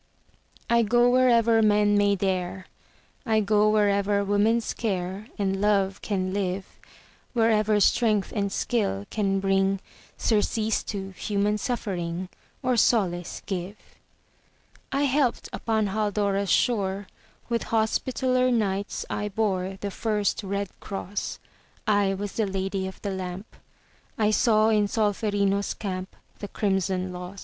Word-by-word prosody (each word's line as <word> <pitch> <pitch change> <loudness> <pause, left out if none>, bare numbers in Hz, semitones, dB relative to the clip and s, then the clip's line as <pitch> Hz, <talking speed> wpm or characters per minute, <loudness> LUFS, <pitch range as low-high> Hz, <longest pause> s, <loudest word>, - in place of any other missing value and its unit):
I 235 0 +4
go 240 +2 +4
wherever 235 -3 +4
men 210 -1 +4
may 205 0 +3
dare, 185 -1 -2 0.6
I 220 -1 +2
go 210 0 +3
wherever 200 -1 +2
woman's 215 +3 +2
care 195 -1 -3
And 195 -2 -1
love 195 -2 +1
can 185 -3 -2
live, 195 -1 -3 0.5
Wherever 220 -3 +3
strength 215 -1 +2
and 200 -2 0
skill 200 - -1
can 195 -2 0
bring 195 0 +1 0.4
Surcease 220 0 +1
to 195 -2 -5
human 205 +2 -1
suffering, 185 -7 -3 0.3
Or 255 -1 +1
solace 185 -7 +1
give. 190 +1 -4 1.1
I 275 +1 +1
helped 275 -3 +1
upon 220 -3 0
Haldora's 200 -1 0
shore; 200 -4 +1 0.4
With 235 -1 -1
Hospitaller 255 +3 +1
Knights 200 -4 -1
I 210 - -3
bore 190 -3 -1
The 200 - -3
first 210 -1 -1
red 200 0 -3
cross; 200 0 -5 0.5
I 205 -3 +2
was 200 +1 -4
the 220 -2 -1
Lady 190 0 -2
of 190 - -9
the 200 - -2
Lamp; 190 +2 -6 0.6
I 215 -1 +2
saw 215 -1 +4
in 210 -2 +3
Solferino's 205 -2 0
camp 185 -2 -5 0.2
The 205 - -5
crimson 190 -2 -1
loss. 180 +2 -8
205 Hz, 125 wpm, -26 LUFS, 195-220 Hz, 1.1 s, I